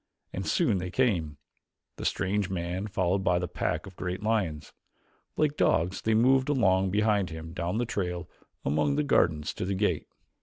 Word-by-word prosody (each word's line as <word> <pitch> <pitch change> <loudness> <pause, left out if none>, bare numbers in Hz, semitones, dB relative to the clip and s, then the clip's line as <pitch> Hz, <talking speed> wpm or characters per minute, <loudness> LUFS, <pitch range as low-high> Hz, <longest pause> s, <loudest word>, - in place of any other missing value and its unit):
And - - -4
soon 95 - +2
they 90 +1 -4
came 90 - 0 0.6
the - - -6
strange 100 0 0
man 90 +2 -3
followed 95 -1 0
by 90 -2 +3
the 90 0 -1
pack 80 -1 -2
of 95 -2 -11
great 90 +2 -4
lions. 100 -9 -1 0.6
Like 150 -1 +2
dogs 90 +4 +2
they 110 0 +2
moved 130 +4 +4
along 95 -9 +3
behind 105 -1 +2
him 80 0 -8
down 90 +3 -2
the 120 - +1
trail 90 -5 -3 0.4
among 75 0 +1
the 75 - +1
gardens 75 +1 +2
to - - -4
the 95 +1 -1
gate. 95 -5 0
95 Hz, 175 wpm, -28 LUFS, 85-105 Hz, 0.6 s, moved